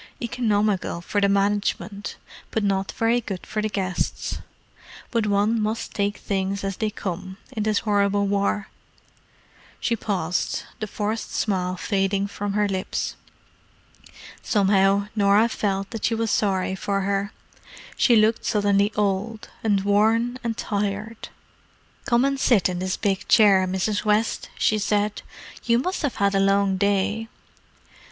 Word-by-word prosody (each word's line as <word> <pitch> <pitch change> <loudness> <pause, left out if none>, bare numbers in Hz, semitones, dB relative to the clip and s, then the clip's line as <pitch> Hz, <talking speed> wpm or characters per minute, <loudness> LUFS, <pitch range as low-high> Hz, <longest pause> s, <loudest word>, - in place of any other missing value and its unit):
Economical 215 -7 0
for 205 +4 -1
the 200 - +3
management, 200 0 -1 0.3
but 220 - -1
not 195 -1 0
very 230 +2 +2
good 195 -5 -6
for 215 - -2
the 215 - -1
guests. 190 -3 -2 0.7
But 230 -3 +1
one 210 +3 +2
must 215 +1 -2
take 205 0 -1
things 195 0 -2
as 195 -1 -3
they 220 - 0
come, 190 -2 -5
in 225 -5 -4
this 215 0 +1
horrible 200 -1 +2
war." 200 0 0 1.1
She 235 - 0
paused, 185 -6 -2 0.2
the 215 - -3
forced 215 +2 -3
smile 185 -3 0
fading 195 0 0
from 200 0 -4
her 210 0 +2
lips. 190 -1 -2 1.3
Somehow 200 -1 +3
Norah 205 +2 +4
felt 195 -3 -2
that 225 -2 -3
she 230 - +1
was 225 -1 -1
sorry 190 -3 +1
for 195 +1 -1
her: 200 +1 -1 0.6
she 240 - +4
looked 220 +1 +3
suddenly 205 0 +2
old, 210 +2 -1
and 205 -3 +2
worn 225 +5 +2
and 230 -1 -2
tired. 210 +1 -3 0.8
"Come 235 +2 +3
and 275 0 0
sit 230 -8 +4
in 180 -1 -3
this 185 0 -2
big 200 0 -1
chair, 195 -4 +5
Mrs. 190 +3 -1
West," 215 +1 +1
she 215 - +2
said. 205 +1 0 0.4
"You 235 -1 +4
must 365 +10 -1
have 285 -5 -1
had 200 0 +1
a 195 - +2
long 195 0 +3
day." 205 +3 +1
205 Hz, 145 wpm, -24 LUFS, 195-215 Hz, 1.3 s, chair